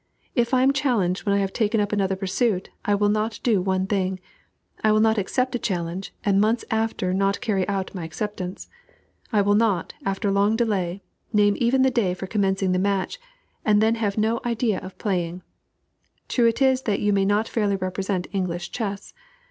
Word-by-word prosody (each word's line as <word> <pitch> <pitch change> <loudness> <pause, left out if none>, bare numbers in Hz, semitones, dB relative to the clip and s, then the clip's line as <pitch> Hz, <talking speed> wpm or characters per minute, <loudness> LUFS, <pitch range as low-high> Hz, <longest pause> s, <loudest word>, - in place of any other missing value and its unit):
If 235 -2 +1
I 255 -1 +4
am 270 +1 +4
challenged 220 -10 0
when 200 - +3
I - - +3
have 195 -1 -1
taken 220 -1 +1
up 205 -1 0
another 195 -2 +1
pursuit 195 +1 -1
I 205 - +2
will 205 0 +2
not 215 +1 -1
do 220 -6 +3
one 190 0 0
thing. 190 -1 -1 0.6
I 215 - +4
will 215 - +4
not 220 0 +3
accept 255 +6 -1
a 245 - -1
challenge, 180 -1 -3
and 200 -1 +3
months 225 +3 +1
after 220 -4 0
not 195 +1 +1
carry 205 -6 0
out 195 -2 -2
my 180 -4 -5
acceptance. 185 +3 -5 0.6
I 210 -3 +3
will 205 +1 +3
not, 205 -5 +1
after 195 +1 -1
long 200 +2 +3
delay, 200 -5 -1 0.3
name 205 -1 +4
even 255 +2 +3
the 265 - +3
day 200 -7 +1
for 190 - -6
commencing 195 -1 0
the 180 - +1
match, 200 - -1 0.4
and 210 -1 +4
then 220 +1 +3
have 215 -3 -1
no 220 +2 +1
idea 235 -3 0
of 185 - -10
playing. 180 -3 -2 0.8
True 240 -2 +3
it 230 +4 +1
is 260 -1 +3
that 200 - +1
you 205 0 +2
may 195 -1 +3
not 205 +3 +1
fairly 205 -3 0
represent 190 0 -2
English 175 -2 -2
chess. 205 -4 -4
205 Hz, 195 wpm, -24 LUFS, 190-225 Hz, 0.8 s, I